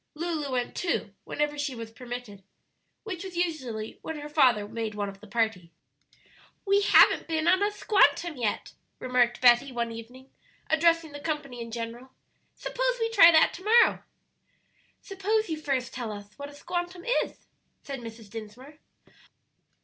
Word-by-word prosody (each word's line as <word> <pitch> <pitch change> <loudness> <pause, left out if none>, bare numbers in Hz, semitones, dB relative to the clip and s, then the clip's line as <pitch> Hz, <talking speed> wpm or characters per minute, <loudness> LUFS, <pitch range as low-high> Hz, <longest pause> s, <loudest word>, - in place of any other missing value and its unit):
Lulu 310 -3 -3
went, 245 -1 -2
too, 350 - -2
whenever 295 0 -2
she 285 -3 -2
was 230 -1 -8
permitted, 240 -3 -8 0.6
which 380 -5 -6
was 375 -3 -8
usually 260 -11 -3
when 320 - -5
her 295 0 -7
father 250 -9 +3
made 220 -1 -4
one 205 -1 -2
of 195 0 -12
the 215 - -14
party. 220 -6 -1 0.9
"We 400 0 +3
haven't 405 - +5
been 320 0 -1
on 370 +2 +4
a 410 - +3
'squantum' 395 -5 +2
yet," 215 -3 -2 0.2
remarked 250 -2 +1
Betty, 245 +2 +5
one 235 -2 -2
evening, 245 +4 -11 0.4
addressing 330 0 +3
the 290 - -8
company 285 -5 -4
in 230 - -6
general; 235 +3 -7 0.4
"suppose - - -1
we 455 0 0
try 340 -7 +8
that 320 -1 +5
to 370 - -10
morrow." 460 +3 +4 1.0
"Suppose 415 +2 -1
you 315 -1 -3
first 260 -4 -2
tell 240 -4 -4
us 205 0 -9
what 285 0 -8
a 285 - -14
'squantum' 350 +3 -5 0.2
is," - - -12 0.4
said 275 -2 -6
Mrs. 225 -2 -10
Dinsmore. 240 +7 -10
275 Hz, 155 wpm, -27 LUFS, 230-335 Hz, 1.0 s, try